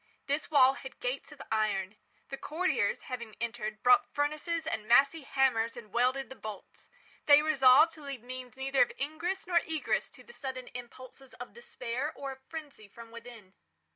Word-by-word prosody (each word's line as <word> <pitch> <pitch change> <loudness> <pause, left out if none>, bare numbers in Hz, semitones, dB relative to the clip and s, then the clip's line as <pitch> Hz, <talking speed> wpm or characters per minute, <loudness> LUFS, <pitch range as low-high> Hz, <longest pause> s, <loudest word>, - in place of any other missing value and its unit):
This 285 +2 -2
wall 270 -3 +6
had 265 -1 -10
gates 255 +5 -3
of 295 - -10
iron. 215 -2 0 0.3
The 275 - -5
courtiers, 350 +7 -1
having 235 -4 -7
entered, 220 -2 -4
brought 415 -1 +5
furnaces 305 +3 -1
and 220 -10 -3
massy 275 +7 +5
hammers 255 -5 +1
and 215 -4 -11
welded 255 +3 +1
the - - -7
bolts. 215 -5 -10 0.4
They 290 0 +8
resolved 305 +1 +6
to 315 - -13
leave 275 -5 -7
means 255 0 -8
neither 270 0 +1
of 245 - +4
ingress 335 +7 -3
nor 350 -1 +3
egress 320 -2 -1
to - - -16
the 475 - -15
sudden 260 - -6
impulses 255 +2 -11
of - - -9
despair 300 - -4
or 275 -1 -5
of 265 0 -11
frenzy 295 -9 -8
from 230 +3 -13
within. 230 -4 -12
265 Hz, 170 wpm, -31 LUFS, 235-300 Hz, 0.4 s, They